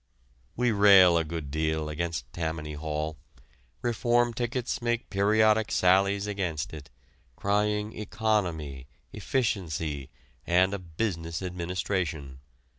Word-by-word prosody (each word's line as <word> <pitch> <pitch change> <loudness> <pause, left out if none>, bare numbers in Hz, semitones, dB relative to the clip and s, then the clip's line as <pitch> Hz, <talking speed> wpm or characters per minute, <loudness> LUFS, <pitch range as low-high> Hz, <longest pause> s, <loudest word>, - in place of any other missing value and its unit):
We 125 0 +2
rail 100 -4 +7
a 85 - +3
good 80 -3 -6
deal 80 0 -1
against 75 -5 -4
Tammany 80 -2 -3
Hall. 75 +1 -3 0.7
Reform 120 0 +2
tickets 120 +1 -2
make 120 0 -1
periodic 110 +2 +3
sallies 100 +2 +3
against 95 -8 -3
it, 75 -3 -9 0.5
crying 105 +3 0
economy, 90 - -2 0.3
efficiency, 80 - -2 0.3
and 90 +3 +3
a 100 - -2
business 85 -1 -3
administration. 85 -6 -3
90 Hz, 105 wpm, -28 LUFS, 80-105 Hz, 0.7 s, rail